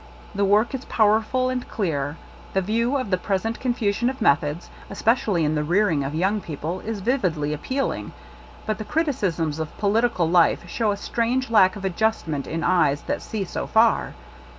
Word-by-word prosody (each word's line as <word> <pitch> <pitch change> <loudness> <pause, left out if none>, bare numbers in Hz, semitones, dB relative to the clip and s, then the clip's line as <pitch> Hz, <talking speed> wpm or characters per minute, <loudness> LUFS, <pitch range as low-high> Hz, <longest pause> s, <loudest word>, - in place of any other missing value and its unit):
The 200 0 0
work 210 +6 +3
is 265 0 -4
powerful 225 +4 +2
and 250 -1 -4
clear; 150 -7 -2 0.4
the 195 - +2
view 230 +7 0
of 255 -7 -4
the 185 - +2
present 205 +4 -2
confusion 240 -2 0
of 265 +1 -6
methods, 150 -4 +1 0.2
especially 205 -5 +1
in 150 - +1
the 150 -1 0
rearing 175 -2 +2
of 140 +3 -4
young 195 +5 +1
peo 160 -5 -6
ple, 165 +6 -4
is 215 -1 -5
vividly 180 - 0
appealing; 260 - -3 0.5
but 215 0 -2
the - - -3
criti 300 +7 0
cisms 165 - -2
of 160 -1 -5
political 210 -3 +1
life 170 0 +3
show 220 +4 -1
a 200 - 0
strange 240 +4 -1
lack 190 -4 +5
of 200 -1 -6
adjustment 180 -7 -1
in 165 +1 -3
eyes 145 -6 +2
that - - -3
see 215 -3 -4
so - - -4
far. 225 +1 +2
200 Hz, 180 wpm, -23 LUFS, 165-230 Hz, 0.5 s, lack